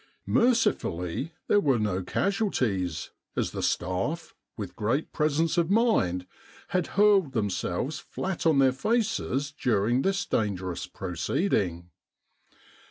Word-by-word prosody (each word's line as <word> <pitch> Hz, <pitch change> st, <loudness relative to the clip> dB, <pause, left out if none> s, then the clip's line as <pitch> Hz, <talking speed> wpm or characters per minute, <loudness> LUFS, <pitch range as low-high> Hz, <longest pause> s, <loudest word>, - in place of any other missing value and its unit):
Mercifully 170 Hz, -, +1 dB, 0.2 s
there 205 Hz, -, +5 dB
were 140 Hz, -9 st, +2 dB
no 105 Hz, -4 st, 0 dB
casualties, 100 Hz, -, -1 dB, 0.2 s
as -, -, 0 dB
the -, -, -4 dB
staff, 95 Hz, -, -1 dB, 0.2 s
with 100 Hz, -5 st, -6 dB
great 115 Hz, +8 st, -1 dB
presence 155 Hz, +2 st, +1 dB
of 170 Hz, 0 st, +1 dB
mind, 195 Hz, -, +2 dB, 0.4 s
had 180 Hz, -2 st, 0 dB
hurled 200 Hz, -8 st, +5 dB
themselves 105 Hz, -, -1 dB
flat 190 Hz, -2 st, -4 dB
on 155 Hz, -3 st, +4 dB
their 135 Hz, -1 st, +5 dB
faces 195 Hz, -, 0 dB
during 120 Hz, -3 st, +1 dB
this 195 Hz, 0 st, 0 dB
dangerous 95 Hz, -5 st, -2 dB
proceeding. 90 Hz, -, -1 dB
135 Hz, 110 wpm, -27 LUFS, -, 0.4 s, there